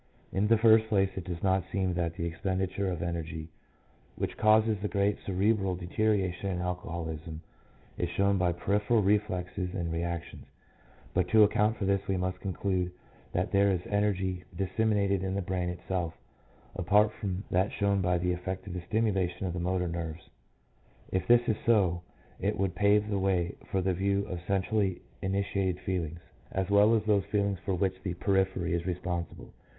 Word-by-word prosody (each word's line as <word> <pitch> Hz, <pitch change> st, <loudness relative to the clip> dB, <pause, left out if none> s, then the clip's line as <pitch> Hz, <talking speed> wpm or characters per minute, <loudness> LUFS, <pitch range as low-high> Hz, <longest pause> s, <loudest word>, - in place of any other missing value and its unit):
In 100 Hz, +2 st, +1 dB
the 115 Hz, +1 st, +5 dB
first 110 Hz, 0 st, +6 dB
place 95 Hz, -3 st, +2 dB
it 95 Hz, -, -5 dB
does 85 Hz, -2 st, -5 dB
not 95 Hz, -1 st, +2 dB
seem 95 Hz, -2 st, 0 dB
that 85 Hz, -1 st, -1 dB
the 85 Hz, -, -3 dB
expenditure 95 Hz, +3 st, -1 dB
of 85 Hz, -2 st, -3 dB
energy 80 Hz, -2 st, -4 dB, 0.7 s
which -, -, -3 dB
causes 110 Hz, 0 st, +4 dB
the 105 Hz, -, 0 dB
great 100 Hz, 0 st, +1 dB
cerebral 95 Hz, 0 st, +1 dB
deterioration 95 Hz, +1 st, 0 dB
in 90 Hz, -2 st, -2 dB
alcoholism 85 Hz, -3 st, -4 dB, 0.6 s
is -, -, 0 dB
shown 100 Hz, 0 st, +2 dB
by 90 Hz, -1 st, +2 dB
peripheral 105 Hz, +5 st, +1 dB
reflexes 95 Hz, -2 st, 0 dB
and 85 Hz, -3 st, -2 dB
reactions, 85 Hz, 0 st, -4 dB, 0.7 s
but 90 Hz, 0 st, +2 dB
to 110 Hz, +4 st, +6 dB
account 105 Hz, +1 st, +2 dB
for 100 Hz, -, -2 dB
this 100 Hz, 0 st, +2 dB
we 95 Hz, -, 0 dB
must 90 Hz, 0 st, -2 dB
conclude 95 Hz, -2 st, -1 dB, 0.4 s
that -, -, 0 dB
there 100 Hz, 0 st, +4 dB
is 90 Hz, -2 st, 0 dB
energy 95 Hz, -3 st, 0 dB
disseminated 100 Hz, 0 st, +1 dB
in 95 Hz, 0 st, -2 dB
the 100 Hz, -, 0 dB
brain 90 Hz, -1 st, -1 dB
itself 90 Hz, -1 st, -3 dB, 0.6 s
apart 105 Hz, +4 st, +4 dB
from 95 Hz, -1 st, -4 dB
that 95 Hz, +3 st, +2 dB
shown 100 Hz, -1 st, +1 dB
by 90 Hz, -1 st, +2 dB
the 90 Hz, +1 st, 0 dB
effect 95 Hz, +1 st, -4 dB
of 100 Hz, -, -6 dB
the 90 Hz, -, -4 dB
stimulation 95 Hz, -2 st, 0 dB
of 90 Hz, -, -2 dB
the 90 Hz, -, -3 dB
motor 90 Hz, +1 st, 0 dB
nerves. 85 Hz, -1 st, -5 dB, 0.8 s
If 95 Hz, 0 st, -1 dB
this 120 Hz, 0 st, +5 dB
is 110 Hz, -, +1 dB
so 95 Hz, -7 st, +3 dB, 0.4 s
it -, -, 0 dB
would 95 Hz, -2 st, 0 dB
pave 105 Hz, +1 st, +3 dB
the 100 Hz, -2 st, -1 dB
way 95 Hz, -3 st, +1 dB, 0.2 s
for 95 Hz, -, 0 dB
the 95 Hz, 0 st, +1 dB
view 100 Hz, +2 st, 0 dB
of 90 Hz, -, -5 dB
centrally 100 Hz, -1 st, 0 dB, 0.2 s
initiated 95 Hz, -1 st, -1 dB
feelings, 85 Hz, -3 st, -3 dB, 0.3 s
as 95 Hz, +1 st, -1 dB
well 105 Hz, +3 st, +6 dB
as 110 Hz, -, +1 dB
those 105 Hz, -3 st, +2 dB
feelings 100 Hz, -2 st, 0 dB
for 95 Hz, -, 0 dB
which 95 Hz, 0 st, -1 dB
the 90 Hz, -3 st, -3 dB
periphery 95 Hz, -2 st, +1 dB
is 85 Hz, +1 st, -1 dB
responsible. 90 Hz, -1 st, -4 dB
95 Hz, 175 wpm, -30 LUFS, 90-100 Hz, 0.8 s, first